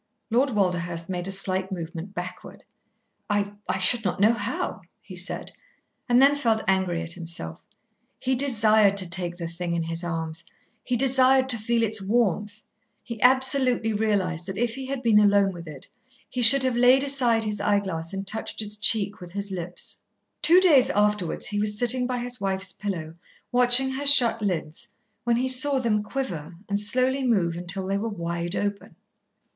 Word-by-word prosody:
Lord 255 +5 +2
Walderhurst 175 -5 -2
made 180 0 -3
a - - -4
slight 190 -1 -2
movement 170 +2 -7
backward. 180 +1 -8 0.7
"I 205 0 -1 0.2
I - - +1
should 195 +5 +1
not 185 -2 -2
know 215 +3 +4
how," 220 -1 -4 0.2
he 185 - -12
said, 180 +1 -3 0.6
and 245 0 +4
then 280 +2 +5
felt 230 -6 0
angry 190 -3 0
at 165 0 +1
himself. 165 - -6 0.5
He 260 - -2
desired 220 -6 +3
to 185 -2 +4
take 175 0 -2
the 170 - -6
thing 170 +1 -4
in 165 - -1
his 165 +1 -3
arms. 165 -1 -5 0.4
He 250 - -1
desired 265 +1 +4
to 240 - +3
feel 230 +2 0
its 220 -1 0
warmth. 210 0 -1 0.4
He 235 -3 -8
absolutely 255 -3 +4
realised 195 -5 -1
that 190 0 -5
if 235 0 -1
he 265 +1 -7
had 270 -1 -5
been 220 -3 +4
alone 200 -2 +3
with 170 -1 -10
it, 145 -4 -10 0.4
he 250 - -4
should 260 +3 +7
have 255 -2 0
laid 250 +3 +4
aside 250 -5 +2
his 210 -2 -2
eyeglass 195 -6 -1
and 195 0 -5
touched 215 +3 -5
its 210 0 -4
cheek 210 -1 0
with 175 -1 -11
his 200 0 -4
lips. 175 -1 -6 0.4
Two 335 +4 +6
days 305 -9 +5
afterwards 210 -4 0
he 205 0 -1
was 210 0 -1
sitting 245 +2 +1
by 250 -1 -3
his 245 -2 -5
wife's 190 -1 -1
pillow, 170 -6 -5 0.4
watching 250 +2 +4
her 275 +2 -5
shut 240 -5 +6
lids, 170 -6 -4 0.4
when 240 -1 +2
he 250 +2 -1
saw 260 +2 +3
them 225 -5 0
quiver 200 - -6
and 200 0 -1
slowly 255 +6 +1
move 190 -9 0
until 180 +2 -5
they 195 +1 -2
were 225 +2 -3
wide 170 -2 -4
open. 205 -4 -4
205 Hz, 180 wpm, -24 LUFS, 180-245 Hz, 0.7 s, should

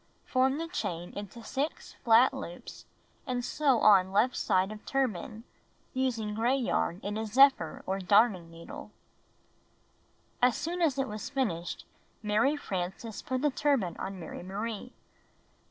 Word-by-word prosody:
Form 265 +1 +2
the 330 +1 -3
chain 175 - -4
into 205 +3 -7
6 280 +7 -3
flat 235 +3 +6
loops 220 -10 -8 0.4
and 245 -1 -2
sew 275 -5 +2
on 190 -3 +6
left 215 +6 +3
side 185 +2 +1
of 215 0 -9
tur 270 -1 +1
ban, 215 +2 -8 0.5
using 235 -5 -1
gray 235 +5 +2
yarn 230 -8 0
in 205 +1 -3
a 220 - -2
zephyr 270 +3 +4
or 190 +1 -1
darning 195 -2 +3
needle. 165 0 -10 1.5
As 250 -1 +4
soon 345 +4 -3
as 305 -6 +2
it 270 -1 0
was 210 -1 -6
finished, 195 -12 -2 0.4
Mary 215 +8 +2
Frances 195 -1 -4
put 260 +1 -3
the 295 - +3
turban 265 - +1
on 190 -1 -5
Mary 165 - -7
Marie. 210 +6 -5
225 Hz, 145 wpm, -30 LUFS, 195-265 Hz, 1.5 s, flat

